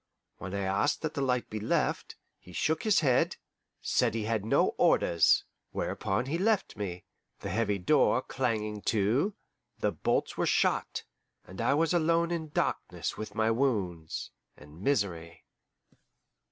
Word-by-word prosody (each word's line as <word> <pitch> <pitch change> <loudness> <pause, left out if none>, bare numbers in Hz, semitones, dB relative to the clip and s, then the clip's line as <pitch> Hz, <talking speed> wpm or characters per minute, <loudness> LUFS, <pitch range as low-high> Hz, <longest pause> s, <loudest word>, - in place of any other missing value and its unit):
When 95 +1 -5
I 100 - -1
asked 100 +12 0
that 155 - -3
a - - +1
light 125 -2 0
be 110 - -5
left, 105 - -1 0.2
he 90 - -15
shook 160 - 0
his 215 -5 +3
head, 130 -5 +2 0.5
said - - +1
he 115 - -1
had 110 -1 -1
no 110 - +3
orders. 85 -2 +4 0.3
Whereupon 100 +6 -1
he 155 +5 -2
left 215 +1 +1
me, 90 -4 -5 0.4
the - - -4
heavy 105 0 +1
door 130 +6 +3
clanging 110 -5 -2
to, 115 - +1 0.4
the - - 0
bolts - - -1
were - - +1
shot, - - +1 0.4
and 95 +4 -8
I 120 +4 +3
was 165 +2 +2
alone 170 0 +2
in 160 -2 -3
darkness - - -2
with 110 -1 -7
my 110 0 +2
wounds 100 - -1 0.3
and 75 +3 -14
misery. 95 -10 -1
115 Hz, 150 wpm, -30 LUFS, 100-145 Hz, 0.5 s, orders